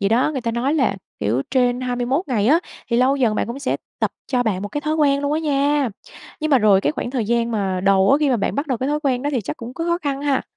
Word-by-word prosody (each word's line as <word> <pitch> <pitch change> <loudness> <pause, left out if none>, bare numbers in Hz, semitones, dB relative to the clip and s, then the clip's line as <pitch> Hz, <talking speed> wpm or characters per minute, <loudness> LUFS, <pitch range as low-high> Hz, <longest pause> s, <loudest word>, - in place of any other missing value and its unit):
gì 200 - +2
đó, 245 +7 +2
người 265 - -2
ta 230 - -2
nói 250 +6 0
là 250 -10 +1 0.2
kiểu 120 +6 0
trên 250 -1 +2
21 255 +6 -1
ngày 220 -5 +1
á, 310 +6 +5 0.3
thì 235 - +2
lâu 260 +3 +3
dần 235 -6 +2
bạn - - -1
cũng 235 +4 -5
sẽ 280 - -1 0.2
tập - - 0 0.2
cho 250 -2 +1
bạn 200 -4 -1
một 205 - -4
cái 290 - -3
thói 310 +1 -1
quen 280 -2 +2
luôn 285 +1 -1
á 310 - 0
nha. 290 -2 +1 0.5
Nhưng 310 0 -1
mà 270 - +6
rồi 205 -3 +4
cái 150 - 0
khoảng 240 - -4
thời 250 -5 -1
gian 235 +1 0
mà 195 -4 -1
đầu 195 +1 +4
á, 275 - +6
khi 290 -3 +2
mà 245 - +3
bạn 200 - -1
bắt 285 +3 -2
đầu 255 -5 -1
cái 260 - -1
thói 300 +1 0
quen 260 -3 0
đó 290 - -1
thì 255 - +1
chắc 205 - -5
cũng 240 +2 -8
có 330 - -3
khó 340 0 +1
khăn 280 -1 -2
ha? 280 -2 +1
255 Hz, 300 wpm, -21 LUFS, 230-285 Hz, 0.5 s, mà